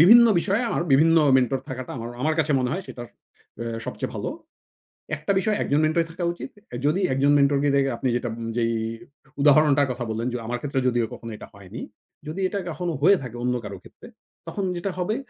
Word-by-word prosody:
বিভিন্ন 235 +8 +9
বিষয়ে 200 +5 +1 0.3
বিভিন্ন 165 +4 +5 0.2
মেন্টর 130 +1 +1
থাকাটা 130 -1 -6
আমার 115 +1 -5
আমর 155 +2 +2
কাছে 155 -1 +2
মনে 125 0 0
হয় 190 - -2
সেটা 120 - -7 0.6
অ্যা 115 -1 -4
সবচেয়ে - - -4
ভালো। - - -3 0.9
একটা 155 +6 -2
বিষয় 215 +2 +1
একজন 145 - +1
মেন্টর 160 +2 +2
থাকা 175 +2 -5
উচিত। 175 - -8 0.4
যদি 155 +7 +2
একজন 140 +2 +3
মেন্টর 140 0 +4
কে 145 - +3
দেখে 135 -1 +3
আপনি 130 - -1
যেটা 120 0 -1 0.3
যেই 115 -1 +1 0.7
উদাহরণটার 145 -1 +5
কথা 125 -1 -4
বললেন 115 +2 -2
যে - - -1
আমার 120 +1 -2
ক্ষেত্রে 140 -2 -1
যদিও 120 -2 +2
কখনো 115 -1 -8
এটা - - -10
হয়নি, 100 +3 -10 0.5
যদি 155 +5 -5
এটা 200 +1 -3
কখনো 170 +2 -3
হয়ে 190 +6 +6
থাকে 125 -2 -7
অন্য 125 0 +1
কারো 100 -2 -6
ক্ষেত্রে - - -15 0.4
তখন 200 - -3
যেটা 175 +3 -2
হবে 185 +4 0
145 Hz, 190 wpm, -24 LUFS, 125-170 Hz, 0.9 s, বিভিন্ন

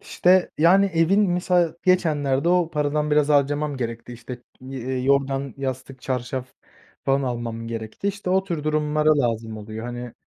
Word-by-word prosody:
İşte, 185 +1 +2
yani 190 +5 +5
evin 190 +3 +2
mesela 175 -2 +1
geçenlerde 155 -5 +2
o 175 -2 +2
paradan 150 0 0
biraz 150 0 +3
harcamam 145 0 +1
gerekti, 115 0 -5
işte, 120 +1 -9 0.2
eee, 130 0 -4
yorgan, 135 -1 +1
yastık, 130 -1 -5
çarşaf 130 0 -3 0.6
falan 135 +1 +2
almam 115 -2 -4
gerekti. 115 - -4
İşte 200 -2 -4
o 190 +1 +2
tür 170 -6 -4
durumlara 155 0 +2
lazım 115 -3 -1
oluyor. 110 +2 -7
Hani, 120 -1 -6
140 Hz, 145 wpm, -23 LUFS, 125-165 Hz, 0.6 s, yani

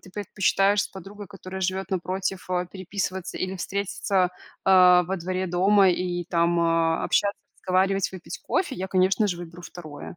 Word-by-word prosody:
ты 185 - -15
предпочитаешь 200 +1 +1
с - - -5
подругой, 200 +2 -10
которая 190 -1 -8
живёт 190 +1 -2
напротив, 185 +1 -3
а, 180 0 0
переписываться 190 0 -5
или 185 +1 -2
встретиться, 195 -1 -1 0.3
а, 180 -1 +7
во 190 +3 -2
дворе 185 +1 -3
дома 190 +3 +4
и 175 -1 -1
там, 170 0 +2
а, 165 -1 +1
общаться, 200 0 +1 0.2
разговаривать, 190 +1 +1
выпить 185 -2 -8
кофе, 360 -8 -1
я, 190 -3 -5
конечно 190 +2 +2
же, 180 - -2
выберу 175 0 -10
2. 165 -3 -9
185 Hz, 160 wpm, -25 LUFS, 180-195 Hz, 0.3 s, а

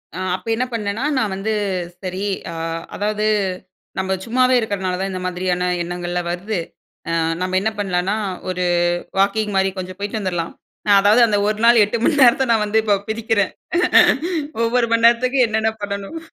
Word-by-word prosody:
அ - - -5 0.2
அப்ப 190 - -11
என்ன 255 +2 -1
பண்ணேன்னா, 215 +2 -2
நான் 215 -5 0
வந்து, 200 +3 -3 0.5
"சரி" 185 +1 -4 0.3
அ - - -7 0.4
அதாவது, 210 +1 -1 0.7
"நம்ப 190 0 -1
சும்மாவே 255 +2 +3
இருக்கறனால 190 -4 -2
தான், 195 0 -2
இந்த 185 -1 -5
மாதிரியான 180 0 -1 0.2
எண்ணங்கள்லாம் 175 0 -3
வருது 200 +4 -3 0.5
அ - - -1 0.3
நம்ம 185 0 -1
என்ன 220 - +1
பண்ணலாம்ன்னா, 190 0 0 0.3
ஒரு 180 0 -2 0.6
வாக்கிங் 205 +1 +1
மாரி 190 0 +2
கொஞ்சம் 185 0 -6
போய்ட்டு 205 +2 -3
வந்துரலாம்." 175 -4 -3 0.5
அதாவது 210 +4 +4
அந்த 210 -2 +1
ஒரு 215 0 -1
நாள், 235 -1 +7
8 210 +3 -2
மணி 290 -3 +2
நேரத்தை 260 +1 +5
நான் 215 -2 +2
வந்து 220 +2 +2
இப்ப 205 -2 +2
பிரிக்கறேன். 220 -2 0 1.1
ஒவ்வொரு 235 +1 +2
மணி 230 0 +2
நேரத்துக்கும், 250 +1 +3
என்னென்ன 220 0 0
பண்ணணும்? 200 +9 -5
205 Hz, 160 wpm, -20 LUFS, 185-225 Hz, 1.1 s, நாள்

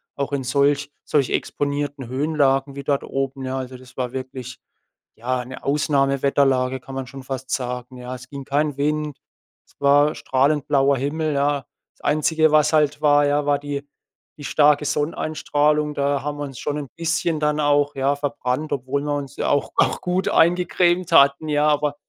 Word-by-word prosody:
Auch 140 0 -3
in 135 -2 -1
solch 140 +2 +1
solch 140 -4 +1
exponierten 145 -2 -2
Höhenlagen 135 0 +1
wie 140 - -6
dort 140 0 0
oben. 135 0 -3
Ja, 130 0 -3
also 130 -1 -5
das 125 0 -15
war 125 -2 -3
wirklich, 130 -1 -7 0.6
ja, 125 +2 -2
'ne 130 +1 -10
Ausnahmewetterlage 135 -2 +1
kann 135 +1 -11
man 135 -1 -4
schon 135 +1 -10
fast 130 0 -6
sagen, 125 0 -3
ja? 125 0 -7
Es 125 0 -12
ging 140 -2 -8
kein 145 0 0
Wind, 150 0 -1 0.5
es - - -27
war 145 +1 +4
strahlend 140 +2 +1
blauer 140 0 +3
Himmel, 155 +3 -1
ja? 140 -1 0 0.3
Das - - -25
einzige 155 +1 +2
was 150 0 +4
halt 150 -1 +2
war, 145 -1 +4
ja, 145 0 +1
war 145 0 +3
die 145 -1 -4 0.5
die 145 - -9
starke 150 0 +3
Sonneneinstrahlung. 150 0 0
Da 140 -1 0
haben 145 0 -3
wir 145 - -2
uns 135 -3 -9
schon 145 0 -2
'n 145 -2 -5
bisschen 165 -1 -1
dann 150 0 +1
auch, 145 0 +2
ja, 135 +1 +1
verbrannt, 145 0 -3
obwohl 135 +1 -2
wir 145 0 -1
uns 140 -1 -6
auch 145 - 0
auch - - +2
gut 180 +1 0
eingecremt 175 +1 +2
hatten, 140 +3 +5
ja? 150 0 +2
Aber, 150 -1 +1
145 Hz, 175 wpm, -22 LUFS, 135-150 Hz, 0.6 s, hatten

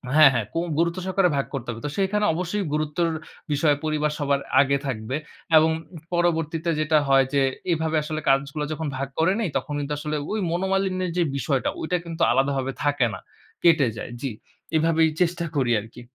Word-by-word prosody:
হ্যাঁ, 155 -3 +8
হ্যাঁ, 115 -4 0
কুম 165 +1 0
গুরুত্ব 170 +2 +1
সহকারে 190 -1 +2
ভাগ 140 - 0
করতে 130 -4 -4
হবে। 115 0 -8
তো - - -1
সেখানে 205 +2 +1
অবশ্যই 180 +5 -2
গুরুত্বের 155 +2 0 0.4
বিষয়, 145 0 +3
পরিবার 150 -1 0
সবার 140 -1 +1 0.2
আগে 140 0 +2
থাকবে। 115 0 -3 0.4
এবং 160 +1 +5 0.3
উ - - -7 0.2
পরবর্তীতে 165 -1 0
যেটা 155 0 +3
হয় 135 -1 +5
যে, 140 - +3 0.3
এভাবে 160 -1 0
আসলে 155 0 -4
কাজগুলো 140 +2 +1
যখন 160 0 -4
ভাগ 135 +1 -2
করে 165 +4 +4
নেই, 215 -6 0
তখন 150 - -4
কিন্তু 145 +1 -3
আসলে 150 0 -3 0.2
ওই 215 - -1
মনোমালিন্যের 185 0 0
যে 175 - +4
বিষয়টা, 135 -2 0
ওইটা 180 +3 0
কিন্তু 165 0 -6
আলাদাভাবে 135 +1 +1
থাকে 145 -3 +2
না 95 - -6 0.4
কেটে 160 -6 +5
যায়। 105 - -6
জি। 135 -4 -2 0.5
এভাবেই 160 0 +3
চেষ্টা 170 -1 +1
করি 130 -4 +2
আরকি। 115 +3 -12
155 Hz, 180 wpm, -24 LUFS, 140-170 Hz, 0.5 s, হ্যাঁ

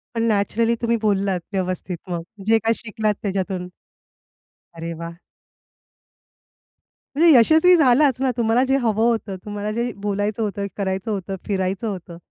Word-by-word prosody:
पण 230 - 0
नॅचरली 225 +2 +1
तुम्ही 235 0 +1
बोललात 200 -3 +1
व्यवस्थित 185 -1 -2
मग. 170 -1 -2 0.2
जे 225 +1 +5
काही 225 +1 +1
शिकलात 215 -1 -1
त्याच्यातून. 190 -2 -2 1.1
अरे 165 0 -5
वाह! 170 0 -7 2.0
म्हणजे 330 +3 +6
यशस्वी 320 +9 +6
झालाच 265 -2 +4
ना. 265 - +2
तुम्हाला 235 +1 +3
जे 270 +1 +3
हवं 225 -4 +1
होतं, 225 -4 -2
तुम्हाला 205 0 -4
जे 235 +2 -2
बोलायचं 205 +2 -1
होतं, 200 -1 -3
करायचं 190 +2 -2
होतं, 195 -1 -3
फिरायचं 195 +1 -1
होतं. 180 -4 -6
210 Hz, 135 wpm, -22 LUFS, 190-230 Hz, 2.0 s, म्हणजे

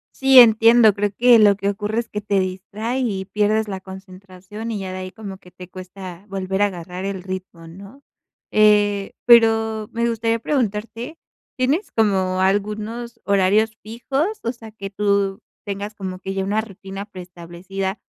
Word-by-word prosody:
Sí, 270 -1 +6
entiendo, 225 -1 +6
creo 205 0 -1
que 245 -1 +6
lo 205 -2 +5
que 200 0 -1
ocurre 210 +2 -3
es 235 - -9
que 210 - -4
te 205 -1 0
distrae 200 +6 -3
y 200 -7 -2
pierdes 210 +2 0
la 190 -2 -5
concentración, 190 +3 -10
y 215 - -3
ya 190 -1 -5
de 185 - -5
ahí 185 0 -6
como 200 -3 -9
que 180 - -18
te 180 0 -12
cuesta 185 0 -10
volver 190 0 -3
a 205 - +5
agarrar 180 0 -6
el 190 -2 -4
ritmo, 185 -3 -7
¿no? 200 +11 -13 0.5
Eh, 205 -2 +3
pero 225 -2 +4
me 235 +1 -1
gustaría 230 0 0
preguntarte, 230 +2 -3 0.4
¿tienes 280 +10 0
como 190 -4 +1
algunos 215 +4 -2
horarios 200 +3 +2
fijos? 255 - -2 0.2
O 235 - -2
sea, 225 -2 -12
que 200 -2 -8
¿tú 200 -1 0 0.2
tienes 205 +1 -5
como 185 -3 -6
que 195 0 -5
ya 195 0 -1
una 210 +2 0
rutina 195 -1 -8
preestablecida 185 +1 -6
205 Hz, 165 wpm, -21 LUFS, 190-225 Hz, 0.5 s, Sí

